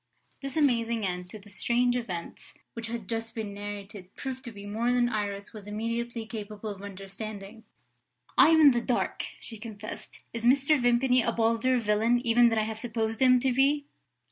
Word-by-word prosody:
This 275 +1 -5
amazing 235 -6 +2
end 180 -1 -3
to 215 - -8
the 205 0 -15
strange 245 +4 +1
events 185 -9 -5 0.2
which 230 -1 -5
had 230 -3 -5
just 225 0 -4
been 215 -3 -4
narrated 200 -1 -8
proved 260 -1 -5
to 235 - -6
be 200 -2 -10
more 225 +4 0
than 245 -1 +3
Iris 200 -2 -3
was 210 -2 -10
immediately 230 +2 -3
capable 215 -1 -6
of 195 -1 -9
understanding. 200 +2 -8 0.7
"I - - +7
am 325 -1 +6
in 290 -2 +9
the 240 -1 +1
dark," 240 +1 -1
she 225 -2 -9
confessed. 215 -1 -8
"Is 230 0 -5
Mr. 275 +3 +4
Vimpany 245 +1 +4
a - - +1
bolder 230 +3 +2
villain 225 +1 +2
even 235 +1 +5
than 225 - 0
I 215 - +3
have 220 0 -4
supposed 225 -1 -2
him 255 -1 +6
to 260 -1 +2
be?" 280 +3 +3
225 Hz, 185 wpm, -28 LUFS, 210-245 Hz, 0.7 s, in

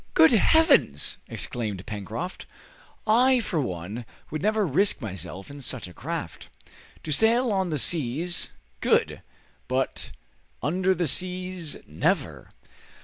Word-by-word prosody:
"Good 160 - +7
Heavens!" 275 - +3
exclaimed 105 -6 -1
Pencroft, 110 - -6 0.6
"I 250 +4 +5
for 175 -9 -1
one 100 +1 -5 0.3
would 155 - -3
never 215 +1 +2
risk 190 +6 +3
myself 95 -2 -7
in 140 0 -10
such 125 -5 -2
a 90 - -12
craft. - - -6 0.5
To 155 - -5
sail 230 - +3
on 190 -3 0
the 155 - -1
seas, 160 +4 0 0.3
good, - - +1 0.5
but 130 +1 -2 0.5
under 185 +6 +1
the 175 -2 0
seas, 180 -1 +1
never!" 75 - -1
160 Hz, 120 wpm, -26 LUFS, 120-190 Hz, 0.6 s, Good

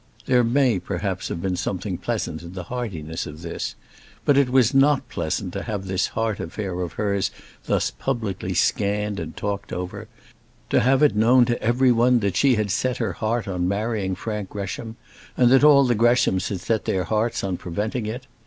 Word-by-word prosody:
There 125 -2 +4
may, 120 -3 +2
perhaps, - - -3
have 85 - -5
been 95 -1 0
something 90 0 -3
pleasant 80 - -3
in 85 +1 -10
the 95 -1 -5
heartiness 90 -10 -4
of 75 +2 -10
this; 85 - -4 0.5
but 145 - +4
it 140 -2 +4
was 130 0 +4
not 135 -1 +4
pleasant 90 +4 -3
to 100 - -3
have 100 -3 -4
this 95 -1 0
heart 110 -2 0
affair 90 +1 -4
of 85 -2 -4
hers 100 -2 0 0.4
thus - - +1
publicly 100 -8 -3
scanned 105 +2 0
and 80 -1 -7
talked 100 -1 -3
over: 90 0 -5 0.6
to - - +4
have 135 +4 +3
it 145 - +4
known 120 +4 +5
to 120 0 -1
every 125 +3 +3
one 120 +1 +4
that 100 -2 -1
she 135 -3 +4
had 105 -2 -1
set 125 +5 0
her 115 -3 -2
heart 115 -1 -2
on 90 -2 -1
marrying 100 -1 -1
Frank 105 -3 -4
Gresham, 105 +3 -5 0.4
and 125 -1 +5
that 135 +1 +6
all 140 -2 +7
the 125 - +3
Greshams 115 -4 +2
had 95 -4 -4
set 110 +2 -1
their 95 -1 0
hearts 110 +5 -1
on 95 -2 -1
preventing 105 +7 -3
it. 125 +4 -5
105 Hz, 190 wpm, -23 LUFS, 95-120 Hz, 0.6 s, all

